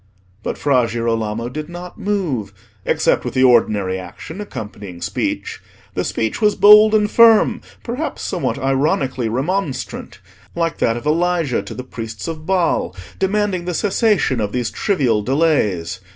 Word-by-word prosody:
But - - -4
Fra 130 -5 +2
Girolamo 115 -1 -2
did 150 +5 -6
not 175 +1 -9
move, 175 - -2 0.3
except - - +1
with - - -5
the 130 - +3
ordinary 105 -7 +3
action 125 - -9
accompanying 105 - -8
speech. - - -3 0.3
The - - -1
speech 110 - -2
was 210 -1 +3
bold 210 +1 +7
and 210 -1 +3
firm, 230 +1 +5 0.2
perhaps 255 +7 -4
somewhat 175 - -2
ironically 135 -3 0
remonstrant, 145 - -3 0.4
like 165 -1 -1
that 115 0 +1
of 120 - -8
Elijah 165 -3 +1
to - - -9
the 130 - -6
priests 115 -4 -7
of 155 -1 -6
Baal, 180 - +1 0.2
demanding 195 -2 0
the 180 -1 -2
cessation 200 - +1
of 105 -1 -2
these 125 -3 -1
trivial 130 - +1
delays. 105 - 0
140 Hz, 145 wpm, -19 LUFS, 115-185 Hz, 0.4 s, bold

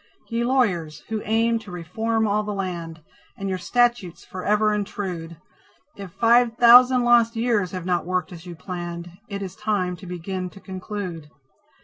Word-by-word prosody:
Ye 230 0 -1
Lawyers, 190 - 0
who 220 -1 -2
aim 230 +2 +2
to 220 -2 -13
reform 220 +6 -1
all 210 +1 +1
the 210 -1 -4
land, 170 -4 -5 0.3
And 195 - -4
your 185 -1 -2
statutes 235 -4 0
forever 210 +3 +1
intrude, 185 -5 -4 0.6
If 195 -3 -9
five 235 0 +3
thousand 245 +1 +7
lost 240 -1 +4
years 225 -5 +1
have 180 -2 -6
not 180 -2 0
worked 185 0 -1
as 175 0 -10
you 175 - -7
planned, 175 0 -6 0.2
It 200 -3 -5
is 190 -1 -7
time 205 -4 -1
to 190 - -11
begin 180 +1 -4
to 195 - -14
conclude. 185 -4 -6
195 Hz, 160 wpm, -23 LUFS, 180-225 Hz, 0.6 s, thousand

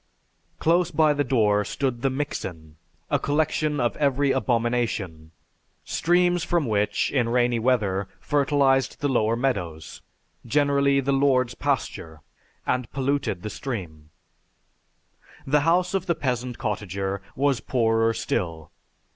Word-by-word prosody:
Close 170 +2 +2
by 155 -2 +3
the 145 0 0
door 105 -6 +2
stood 125 +2 -2
the 135 - +2
mixen, 90 - -5 0.4
a - - +3
collection 150 0 0
of 120 -2 0
every 140 -1 +2
abomination 115 -10 -1 0.6
streams 175 0 +2
from 170 -4 0
which, 105 -3 0
in 125 -4 +1
rainy 120 -1 +2
weather, 105 -6 +1
fertilized 140 -2 +1
the 145 - +1
lower 115 -4 +1
meadows, 90 - -3 0.4
generally 140 +1 +2
the 140 +1 -1
lord's 130 -3 +2
pasture, 120 - -3 0.4
and 125 -2 -1
polluted 135 -9 -1
the 105 - -3
stream. 85 - -6 1.4
The 150 +2 +3
house 175 +5 +2
of 190 -1 -1
the 170 - +1
peasant 125 -3 -2
cottager 100 -1 -3
was 140 -2 +1
poorer 115 -2 +1
still. 80 -7 -3
125 Hz, 120 wpm, -24 LUFS, 105-145 Hz, 1.4 s, by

